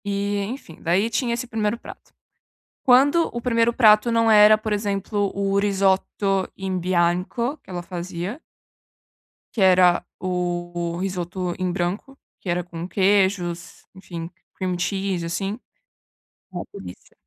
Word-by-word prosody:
E 200 0 -1
enfim, 205 - -8
daí 185 +7 +1
tinha 235 +1 0
esse 245 +2 -4
1º 220 -1 -1
prato. - - -13 0.7
Quando 280 +6 +5
o 235 - -3
1º 230 -1 +2
prato 215 -1 +5
não 230 0 +3
era, 215 0 +7
por 215 0 -3
exemplo, 205 0 -1
o 195 0 0
risoto 195 -1 +1
in 190 -1 -3
bianco 180 - 0
que - - -21
ela 180 -1 -4
fazia 180 - -5 1.1
que 220 - -2
era 180 -2 +5 0.2
o 180 -1 -1 0.4
o - - -5
risoto 180 -1 -3
em 185 -1 0
branco, 190 +10 -3 0.2
que 185 - -7
era 175 +1 0
com 170 0 -7
queijos, 190 -3 0
enfim, 170 -3 -7 0.3
cream 185 -1 -2
cheese 190 -1 -1
assim 195 +6 -3 0.9
ah, - - -4
por 410 - -10
isso. - - -15
195 Hz, 140 wpm, -23 LUFS, 180-215 Hz, 1.1 s, era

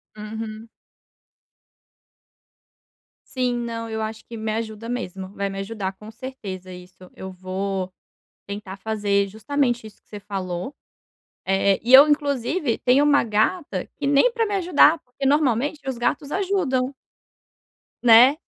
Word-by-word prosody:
Uhum. 220 +1 -7 2.6
Sim. 250 -2 0
Não, 230 -1 -4
eu 220 0 -3
acho 220 0 -5
que 230 - -9
me 220 0 -3
ajuda 225 0 -5
mesmo, 190 -6 -5
vai 200 -1 -2
me 195 - -6
ajudar 195 -1 -4
com 210 +3 -12
certeza 205 -7 -8
isso, 180 0 -13
eu 190 0 -7
vou 185 0 -4 0.6
tentar 200 -1 -7
fazer 205 -1 0
justamente 240 +2 -1
isso 215 - -15
que - - -40
você 210 - -8
falou, 190 +4 -5 0.7
eh, 195 0 +2
e 240 +4 0
eu 275 +3 +11
inclusive 285 -1 0
tenho 260 +3 +4
uma 285 -3 +4
gata 215 - 0
que 285 - -3
nem 285 - +4
pra 460 -1 0
me 410 - -2
ajudar 340 -4 +5
porque 255 +2 -5
normalmente 290 0 +2
os 255 - -3
gatos 280 +4 -1
ajudam. 300 -10 0 1.1
Né, 245 +5 +7
225 Hz, 135 wpm, -23 LUFS, 200-275 Hz, 2.6 s, eu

